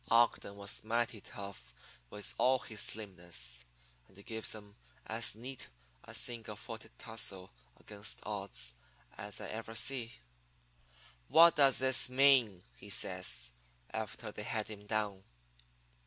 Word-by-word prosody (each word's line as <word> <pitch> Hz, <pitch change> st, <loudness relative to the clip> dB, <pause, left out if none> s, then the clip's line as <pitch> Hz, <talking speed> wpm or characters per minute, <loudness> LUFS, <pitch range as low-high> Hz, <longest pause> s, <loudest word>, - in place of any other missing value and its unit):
Ogden 115 Hz, -3 st, +3 dB
was 100 Hz, 0 st, -1 dB
mighty 115 Hz, -1 st, -1 dB
tough 95 Hz, -15 st, -8 dB, 0.3 s
with 105 Hz, +7 st, -2 dB
all 130 Hz, +1 st, +5 dB
his 110 Hz, -4 st, -2 dB
slimness, 85 Hz, -, -2 dB, 0.4 s
and 95 Hz, -, -20 dB
he 100 Hz, -, -11 dB
gives 110 Hz, 0 st, -1 dB
'em 105 Hz, -1 st, -11 dB, 0.3 s
as 115 Hz, +1 st, 0 dB
neat 125 Hz, +3 st, -7 dB, 0.3 s
a -, -, -7 dB
single 115 Hz, -3 st, -2 dB
footed 115 Hz, +1 st, -8 dB
tussle 100 Hz, -4 st, -2 dB, 0.3 s
against 105 Hz, -1 st, -4 dB
odds 100 Hz, -, -2 dB, 0.4 s
as 105 Hz, 0 st, -5 dB
I -, -, -5 dB
ever 115 Hz, +1 st, -6 dB
see. 120 Hz, 0 st, +3 dB, 1.1 s
"'What 170 Hz, +1 st, +8 dB
does 140 Hz, -3 st, +6 dB
this 130 Hz, -1 st, +5 dB
mean?' 125 Hz, -8 st, +5 dB
he -, -, -12 dB
says, -, -, 0 dB, 0.4 s
after -, -, -5 dB
they -, -, -7 dB
had -, -, -2 dB
him 105 Hz, -1 st, -8 dB
down. 105 Hz, -3 st, -1 dB
110 Hz, 130 wpm, -34 LUFS, 100-120 Hz, 1.1 s, What